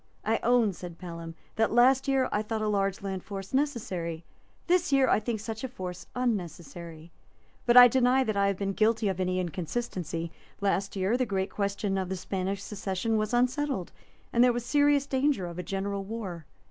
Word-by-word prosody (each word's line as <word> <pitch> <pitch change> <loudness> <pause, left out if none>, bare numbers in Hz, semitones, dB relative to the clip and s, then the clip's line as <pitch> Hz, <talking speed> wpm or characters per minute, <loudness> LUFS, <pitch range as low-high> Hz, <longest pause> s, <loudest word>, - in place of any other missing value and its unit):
"I 225 +1 +2
own," 235 -4 +3
said 175 -1 -9
Pelham, 165 -2 -8 0.2
"that 220 0 +2
last 260 +3 +4
year 265 -2 +2
I 210 - +1
thought 220 0 -3
a - - 0
large 195 -2 0
land 190 -2 -4
force 195 0 -7
necessary; 190 - -1 0.4
this 355 -3 +2
year 270 -1 +4
I - - +4
think 220 0 -3
such 220 +2 -6
a - - -1
force 185 -7 -7
unnecessary; 170 - -4 0.6
but 240 +1 +6
I 245 0 +12
deny 255 +2 +3
that 215 -4 -1
I 200 0 +3
have 200 -2 0
been 195 0 -2
guilty 220 0 +2
of 190 -1 -3
any 185 0 0
inconsistency. 175 -2 -3 0.3
Last 195 0 0
year 195 +5 +1
the 255 -1 0
great 195 -1 -1
question 200 -1 -1
of 185 -1 -3
the 190 - -2
Spanish 190 +1 -3
succession 200 +2 -2
was 215 0 0
unsettled, 250 - 0 0.4
and 235 - +5
there 250 - +6
was 240 0 -3
serious 290 +1 +3
danger 270 -6 +1
of 175 0 -6
a - - 0
general 195 +2 -3
war. 190 -7 -6
200 Hz, 190 wpm, -28 LUFS, 185-245 Hz, 0.6 s, I